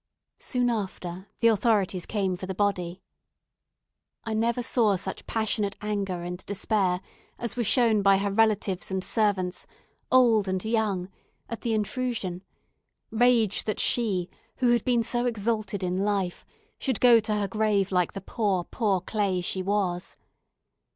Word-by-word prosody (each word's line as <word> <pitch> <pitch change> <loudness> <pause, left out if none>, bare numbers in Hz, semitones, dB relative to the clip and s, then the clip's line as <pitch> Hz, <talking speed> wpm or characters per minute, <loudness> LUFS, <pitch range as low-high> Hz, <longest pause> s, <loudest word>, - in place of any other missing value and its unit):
Soon 245 -2 0
after, 190 -3 -5
the 230 - +6
authorities 205 -5 +1
came 195 -4 -1
for 185 +1 -7
the 190 - -4
body. 185 -2 -1 1.2
I 225 - -3
never 235 +2 0
saw 225 -4 +2
such 190 +1 -6
passionate 215 -2 -1
anger 200 -4 -3
and 180 +1 -6
despair 195 -2 0 0.4
as 235 -3 -4
were 245 - 0
shown 225 -1 +4
by 195 0 +5
her 200 +1 -1
relatives 210 -3 +1
and 190 -1 -2
servants, 190 -5 0 0.4
old 230 -5 +5
and 185 +1 -2
young, 210 -5 0 0.4
at 230 - -5
the 230 -3 0
intrusion 215 -4 -2 0.7
rage 230 -3 +3
that 215 - -2
she, 200 -7 +1 0.3
who 250 -2 +2
had 240 -2 +2
been 240 -2 +2
so 240 +2 0
exalted 215 -3 -2
in 180 0 -1
life, 200 -4 -1 0.3
should 260 -6 -1
go 240 -2 +7
to 215 -1 -1
her 205 -1 0
grave 205 -1 +1
like 180 -2 +1
the 195 - -6
poor, 195 -3 -1
poor 200 -2 0
clay 195 -1 -1
she 180 +1 -2
was. 185 -2 -1
205 Hz, 150 wpm, -26 LUFS, 190-225 Hz, 1.2 s, go